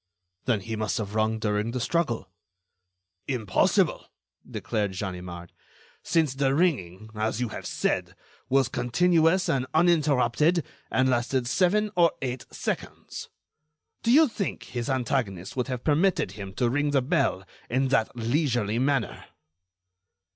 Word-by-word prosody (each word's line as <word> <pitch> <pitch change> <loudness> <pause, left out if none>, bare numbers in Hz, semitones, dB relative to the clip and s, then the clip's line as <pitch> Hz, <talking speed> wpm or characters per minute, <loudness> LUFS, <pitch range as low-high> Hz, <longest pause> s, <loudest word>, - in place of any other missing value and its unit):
"Then 115 -5 +1
he 115 +3 -4
must 110 -1 -1
have 105 -2 -4
rung 110 0 +1
during 105 0 -1
the 125 +2 -3
struggle." 120 - -1 1.0
"Impossible," 115 -8 +1 0.4
declared 105 -5 -2
Ganimard, 90 -3 -6 0.5
"since 160 -5 +1
the 135 0 +1
ringing, 110 - 0
as 110 +1 -1
you 125 -2 -1
have - - -6
said, - - -1 0.3
was 135 -1 +3
continuous 165 +8 +2
and 130 -1 0
uninterrupted, 155 -1 +3 0.2
and 130 0 +2
lasted 125 0 +1
seven 195 - +2
or 170 -2 +4
eight 125 -1 -4
seconds. - - -5 0.7
Do 235 - +2
you 310 +4 +7
think 220 -5 -4
his 120 +2 -4
antagonist 120 -8 -1
would 125 -1 -1
have 125 -2 -4
permitted 160 - +2
him 100 -1 -8
to 125 - +1
ring 145 +2 +1
the 140 -3 +2
bell 125 -7 +1 0.2
in 130 +2 +1
that 125 -4 +1
leisurely 120 -3 0
manner?" 135 -3 0
125 Hz, 135 wpm, -26 LUFS, 110-150 Hz, 1.0 s, you